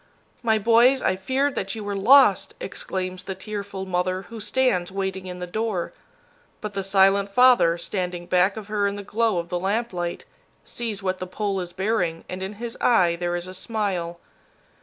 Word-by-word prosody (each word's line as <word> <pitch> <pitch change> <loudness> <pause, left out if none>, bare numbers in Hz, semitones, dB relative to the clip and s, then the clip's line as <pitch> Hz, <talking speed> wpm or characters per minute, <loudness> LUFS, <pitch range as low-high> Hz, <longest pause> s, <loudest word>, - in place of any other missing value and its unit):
"My 220 -2 +2
boys, 235 +5 +4
I 185 - +2
feared 265 +9 0
that 195 -2 -3
you 220 - -6
were 205 0 -3
lost!" 215 0 +5
exclaims 185 -1 -4
the 190 - -4
tearful 200 -1 -5
mother 185 0 -1
who 225 +5 -10
stands 210 -5 +1
waiting 190 -1 -3
in 180 0 -6
the 180 - -5
door. 205 -1 -2 0.7
But 210 -1 -6
the 195 -1 -2
silent 195 +1 +4
father, 240 -7 +5
standing 180 0 -4
back 185 +4 +2
of 215 - -6
her 210 -1 +1
in 200 - -2
the 205 - -6
glow 220 0 0
of 170 0 -3
the 175 - -1
lamplight, 190 -3 -2 0.4
sees 225 -5 -5
what 185 -1 -1
the 185 - -5
pole 200 +1 -2
is 175 -1 -5
bearing, 180 -3 -1
and 185 +1 -6
in 190 +2 -4
his 230 +2 -6
eye 180 -8 +4
there 175 0 -2
is 175 0 -3
a 185 - -8
smile. 185 -5 -3
195 Hz, 185 wpm, -24 LUFS, 180-215 Hz, 0.7 s, lost